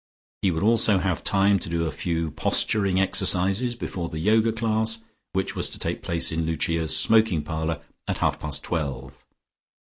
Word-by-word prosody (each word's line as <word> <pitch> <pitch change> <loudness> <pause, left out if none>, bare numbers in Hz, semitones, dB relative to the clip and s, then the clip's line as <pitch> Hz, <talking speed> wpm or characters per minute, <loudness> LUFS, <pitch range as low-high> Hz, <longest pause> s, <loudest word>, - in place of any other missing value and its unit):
He 95 - +2
would 80 +1 -2
also 110 -2 +4
have 90 -2 -1
time 100 0 +3
to 85 - -5
do 85 0 -1
a 80 - -2
few 85 -2 -3
posturing 100 +3 +1
exercises 95 +5 +2
before 90 -7 -5
the - - -15
first 80 - -4
Yoga 110 +1 +3
class, 110 0 0 0.3
which 95 0 -2
was - - 0
to - - -5
take - - -3
place 85 -1 +1
in 80 0 -1
Lucia's 80 -1 0
smoking 110 -2 +3
parlour 80 0 -3 0.2
at - - -2
half - - 0
past 75 -2 -3
twelve. 65 -5 -4
90 Hz, 175 wpm, -24 LUFS, 80-105 Hz, 0.3 s, also